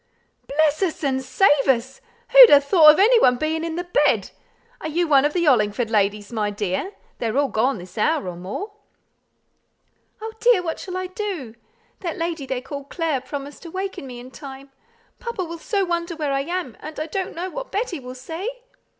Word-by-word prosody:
"Bless 305 +2 +1
us 345 -4 -1
and 265 -2 0
save 290 -2 +3
us! 260 0 0 0.3
who'd - - +10
ha' 290 - +9
thought 305 +1 +7
of - - -3
any 460 +4 +6
one 250 - +5
being 315 +3 -1
in 330 -1 -3
the 350 - -2
bed? 350 -4 +1 0.5
Are - - -4
you 335 +3 0
one 280 -2 +5
of 295 - 0
the 355 - +1
Hollingford 225 -3 +2
ladies, 205 0 0
my 210 -2 0
dear? 205 - -3 0.3
They 235 - -1
are 225 +4 -2
all 285 -1 +2
gone 250 +4 +1
this 180 +3 -10
hour 305 - +1
or 180 - -5
more!" 195 - -6 1.5
"Oh, 445 +1 -6
dear, 470 -6 +4
what 325 -2 -3
shall 370 -1 -5
I 370 - -3
do? 365 - -5 0.5
That 340 -4 -4
lady 330 -4 -3
they 260 -1 -2
call 280 +1 -7
Clare 310 -3 -2
promised 285 +1 -7
to 335 - -9
waken 380 -5 -5
me 245 -1 -8
in 250 +1 -11
time. 270 +1 -11 0.5
Papa 470 -5 -4
will 335 0 -8
so 395 +2 0
wonder 340 -1 -2
where 300 -3 -2
I 275 - +1
am, 345 -8 -4
and 310 0 -8
I 310 - -2
don't 375 +4 -4
know 360 +2 -4
what - - -7
Betty 405 -6 -2
will 255 -1 -9
say." 325 - -5
305 Hz, 200 wpm, -22 LUFS, 260-360 Hz, 1.5 s, who'd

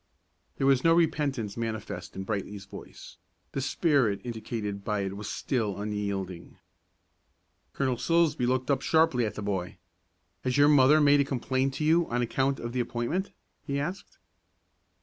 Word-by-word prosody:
There 135 - 0
was 135 -2 +4
no 165 0 +5
repentance 145 -10 0
manifest 110 -7 -5
in 95 - -4
Brightly's 100 -1 -4
voice; 100 - -11 0.3
the 135 - -3
spirit 135 - +2
indicated 110 -4 -4
by 105 -1 -1
it 95 0 -3
was 105 0 -6
still 110 -7 -2
unyielding. 100 -4 -4 1.2
Colonel 130 -3 0
Silsbee 160 -2 +2
looked 130 +2 0
up 135 -1 +1
sharply 140 -7 +3
at - - -6
the 105 - -5
boy. 95 -3 -3 0.7
"Has 130 0 0
your 145 +1 +6
mother 145 +1 +6
made 145 -1 +5
a - - +5
complaint 130 0 -1
to - - -3
you 165 +2 +3
on 120 +1 0
account 135 +3 0
of 120 0 -5
the 130 - -1
appointment?" 120 +11 -2 0.3
he 140 -2 -2
asked. 175 +7 -5
125 Hz, 155 wpm, -28 LUFS, 105-140 Hz, 1.2 s, your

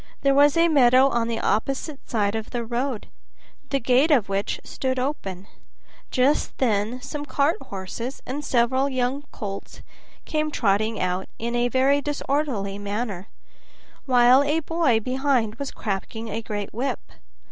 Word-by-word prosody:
There 275 0 +3
was 285 +2 +5
a 335 0 +5
meadow 260 -3 +5
on 235 -3 0
the 230 -1 -2
opposite 270 +7 -2
side 205 -3 +1
of 220 -1 -4
the 240 -2 -3
road, 240 0 -2 0.6
the 275 - +1
gate 255 +5 +3
of 250 -10 +3
which 195 +1 -1
stood 260 -1 -2
open; 200 -9 -3 0.6
just 265 +4 +1
then 225 0 0
some 290 +1 -5
cart 295 +1 +1
horses 230 +2 -6
and 285 +4 -4
several 260 +1 +2
young 260 +2 -1
colts 200 -4 -7 0.4
came 310 -1 -1
trotting 215 -4 +1
out 180 +1 -1
in 235 +1 -3
a 240 0 +2
very 265 +3 +3
disorderly 275 -9 -2
manner, 205 -2 -4 0.8
while 250 +1 +6
a 295 +3 +1
boy 320 -7 +2
behind 255 -2 0
was 280 -1 -3
cracking 220 +2 -4
a 225 - -3
great 205 -2 -5
whip. 255 +5 -2
250 Hz, 145 wpm, -24 LUFS, 220-280 Hz, 0.8 s, while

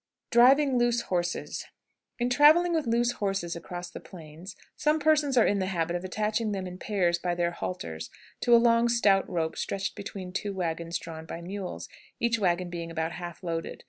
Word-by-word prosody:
DRIVING 260 +2 +5
LOOSE 240 0 +2
HORSES. 175 -1 -2 0.5
In 245 +1 -1
traveling 315 +7 +6
with 315 -6 0
loose 235 +1 +2
horses 195 -6 -2
across 175 +1 -7
the - - -8
plains, 170 +1 -11 0.2
some 300 +1 +2
persons 295 -3 +2
are 235 - +6
in 200 - +2
the 185 - -1
habit 170 -2 -1
of 175 - -3
attaching 215 +3 -1
them 190 -1 -3
in 180 0 -8
pairs 175 -5 0
by 175 0 -1
their 175 0 0
halters 80 - -5 0.3
to 240 - +5
a - - +9
long, 235 0 +4
stout 205 -5 +3
rope 165 -3 -1
stretched 195 -1 -3
between 195 -3 -7
two 200 +1 -3
wagons 170 -1 -2
drawn 160 -1 -9
by 165 - -6
mules, 185 +2 -6 0.3
each 230 -1 +1
wagon 180 -2 0
being 170 -1 -5
about 160 0 -2
half 175 +1 -8
loaded. 165 -1 -4
190 Hz, 185 wpm, -28 LUFS, 175-235 Hz, 0.5 s, a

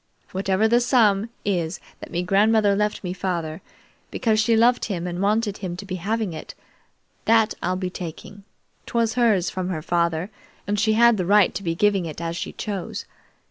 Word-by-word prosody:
"Whatever 190 +2 +1
the 235 +2 +4
sum 225 -4 +3 0.2
is 175 -4 -1 0.2
that - - -9
me 175 +1 -2
grandmother 205 +2 +3
left 210 +1 -1
me 180 -1 -3
father, 170 -4 -3 0.5
because 220 -2 +1
she 225 +1 +3
loved 240 +2 +4
him 180 -4 -3
and 175 0 -4
wanted 210 0 0
him 180 -3 -5
to 200 - -8
be 185 -2 -4
having 210 +1 -2
it, 155 - -8 0.7
that 225 -1 +4
I'll 180 +1 0
be 185 -1 -3
taking. 180 +4 -8 0.4
'Twas 230 -1 0
hers 215 -8 +2
from 185 -1 -3
her 160 -4 -3
father, 170 +2 0 0.3
and 205 +1 -1
she 220 +1 +3
had 235 0 +5
the 180 - -1
right 205 -1 +5
to 185 - -4
be 165 -3 -2
giving 195 -2 +2
it 155 - -7
as 170 0 -3
she - - -4
chose. 200 -4 -5
195 Hz, 185 wpm, -23 LUFS, 175-220 Hz, 0.7 s, had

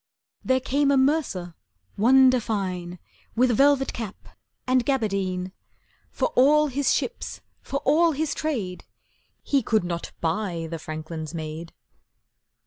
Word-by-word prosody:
There 260 0 +2
came 280 +2 +1
a 280 - +4
mercer 265 - 0 0.4
wonder 255 +3 +5
fine, 185 -5 -3 0.4
With 250 +2 +3
velvet 275 +3 +3
cap 220 -5 -7 0.4
and 255 -1 +2
gaberdine; 195 -8 -1 0.6
For - - -1
all 300 +3 +4
his 275 +1 +1
ships, - - -3 0.2
for 275 +1 -4
all 325 +4 +4
his 300 +1 -1
trade, 220 -13 -3 0.6
He 280 -2 +2
could 220 -3 +1
not 170 -1 -4
buy 170 -1 -2
the 165 - -4
franklin's 155 +1 -6
maid. 160 +1 -6
225 Hz, 125 wpm, -25 LUFS, 180-275 Hz, 0.6 s, wonder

